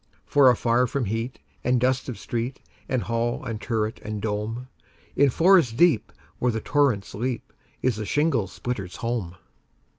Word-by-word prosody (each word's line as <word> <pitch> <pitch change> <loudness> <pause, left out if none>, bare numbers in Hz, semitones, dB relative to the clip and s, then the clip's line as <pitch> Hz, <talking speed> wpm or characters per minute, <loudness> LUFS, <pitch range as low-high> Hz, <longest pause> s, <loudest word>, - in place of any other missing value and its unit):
For 140 -3 +6
afar 120 +1 +3
from 130 +1 -1
heat 115 +5 -3 0.3
and 125 0 +2
dust 130 +1 +1
of 125 - -5
street, 120 +3 -3 0.3
And 130 -3 0
hall 115 +1 -1
and 110 -2 -4
turret, 110 -2 -2
and 105 0 -4
dome, 110 +4 -3 0.5
In 140 0 +5
forest 165 -5 +4
deep, 170 -8 +4 0.3
where 125 - +2
the 110 - -2
torrents 130 -6 +1
leap, 120 +2 -3 0.3
Is 125 -4 +2
the 110 - -3
shingle 145 -9 +1
splitter's 100 -3 -5
home. 115 -7 -3
120 Hz, 155 wpm, -25 LUFS, 110-130 Hz, 0.5 s, For